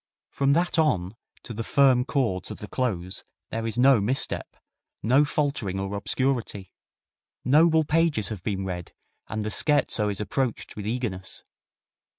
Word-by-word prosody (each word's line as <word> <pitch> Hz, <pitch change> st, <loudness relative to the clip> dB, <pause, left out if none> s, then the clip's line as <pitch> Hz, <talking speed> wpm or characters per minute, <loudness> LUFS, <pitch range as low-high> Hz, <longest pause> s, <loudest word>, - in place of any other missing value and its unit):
From 140 Hz, 0 st, +2 dB
that 170 Hz, +1 st, +1 dB
on 110 Hz, -, +1 dB, 0.3 s
to 120 Hz, -, -7 dB
the 115 Hz, +1 st, -4 dB
firm 130 Hz, -1 st, +4 dB
chords 115 Hz, -11 st, -1 dB
of -, -, -7 dB
the 105 Hz, -, -8 dB
close 95 Hz, -8 st, -3 dB, 0.3 s
there 115 Hz, 0 st, -2 dB
is 110 Hz, -, -3 dB
no 130 Hz, -3 st, +5 dB
misstep, 130 Hz, +7 st, -2 dB, 0.5 s
no 130 Hz, +7 st, +4 dB
faltering 140 Hz, -10 st, -1 dB
or 95 Hz, +1 st, -3 dB
obscurity. 115 Hz, -3 st, -1 dB, 0.7 s
Noble 160 Hz, +4 st, +5 dB
pages 155 Hz, -, +1 dB
have 105 Hz, -5 st, -6 dB
been 95 Hz, 0 st, -3 dB
read, 90 Hz, -2 st, -6 dB, 0.3 s
and 110 Hz, 0 st, -3 dB
the 105 Hz, -, -3 dB
scherzo 140 Hz, -8 st, +2 dB
is 100 Hz, -, -3 dB
approached 125 Hz, +3 st, -2 dB
with 105 Hz, -1 st, -6 dB
eagerness. 110 Hz, -6 st, -4 dB
115 Hz, 150 wpm, -26 LUFS, 100-140 Hz, 0.7 s, no